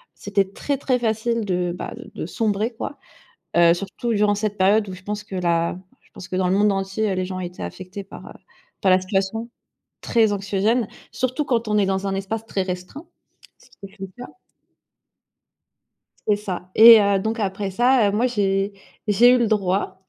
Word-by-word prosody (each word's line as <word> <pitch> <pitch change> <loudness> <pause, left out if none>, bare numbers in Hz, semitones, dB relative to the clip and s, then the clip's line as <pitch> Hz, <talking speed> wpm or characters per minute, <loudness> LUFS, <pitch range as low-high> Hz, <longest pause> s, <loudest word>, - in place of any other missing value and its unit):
c'était 195 -1 -1
très, 280 +7 -2
très 255 -2 0
facile 225 0 -1
de, 180 -2 -1
bah, - - -6 0.2
de - - -4
sombrer, 220 +1 -1
quoi, 280 +5 -6 0.6
heu, 170 -1 +6
surtout 200 +6 -3
durant 205 0 +2
cette 210 0 -2
période 200 +2 +3
où - - -6
je 185 +1 -12
pense 210 +1 -4
que 205 -2 -8
la 170 -1 0 0.2
je - - -29
pense 180 - -10
que 185 - -5
dans 185 -1 +1
le 185 - +2
monde 210 0 +4
entier, 195 +1 -1
les 185 - -1
gens 185 0 -5
étaient 180 0 -6
affectés 185 +2 -7
par, 195 - -12
heu, - - -10 0.5
par 190 - +4
la 185 - +5
situation 195 +4 -2 0.5
très 225 -2 +2
anxiogène, 205 +3 0 0.2
surtout 255 +3 -1
quand 235 -4 0
on 210 0 +1
est 200 - +3
dans 190 +1 -1
un 195 - -1
espace 210 +3 -4
très 200 -3 -2
restreint. 185 - -6 0.5
Ce - - -22
qui - - -24
était 195 +1 -11
le - - -4 0.2
cas. - - -15 2.0
C'est 210 - +4
ça 185 -3 -6
et 225 0 +10
heu, 200 -1 +2
donc 220 +4 -2
après 195 0 -2
ça, 240 +1 +3
heu, - - -1
moi, 225 +5 +2
j'ai 200 -4 0 0.3
j'ai 215 +4 +6
eu - - +3
le 235 - +2
droit 195 -2 -1
200 Hz, 195 wpm, -22 LUFS, 190-225 Hz, 2.0 s, et